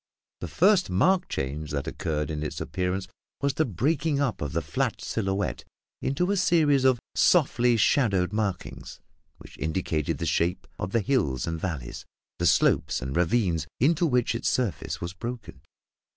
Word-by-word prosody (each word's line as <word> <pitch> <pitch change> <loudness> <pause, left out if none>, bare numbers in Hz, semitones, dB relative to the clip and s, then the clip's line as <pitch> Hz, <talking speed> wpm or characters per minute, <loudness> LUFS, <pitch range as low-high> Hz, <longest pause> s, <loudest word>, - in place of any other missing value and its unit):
The 85 - -5
first 185 - +3
marked 180 - +2
change 70 +3 -3
that 70 -1 -3
occurred 75 0 -3
in 75 -1 -3
its 75 - -4
appearance 90 +5 -2 0.3
was 140 -1 0
the 155 +4 +1
breaking 140 - 0
up 140 -5 -1
of 75 0 -3
the 85 - 0
flat 70 - -1
silhouette 100 -2 -2 0.4
into 175 +8 0
a 200 - +1
series 155 -7 +3
of 130 -2 +4
softly 125 -8 +3
shadowed 100 -5 +2
markings 105 -4 -4 0.4
which - - -15
indicated 80 -1 -1
the 85 - -3
shapes 85 +3 0
of 90 - -3
the 115 - +2
hills 75 - 0
and 80 0 -3
valleys, 75 -10 -4 0.4
the - - +2
slopes - - +3
and 65 +1 -5
ravines 85 -3 +1
into 165 +6 +3
which 125 -5 +1
its 115 - -1
surface 115 -10 -2
was 85 +1 -4
broken. 115 - -7
100 Hz, 160 wpm, -26 LUFS, 80-135 Hz, 0.4 s, of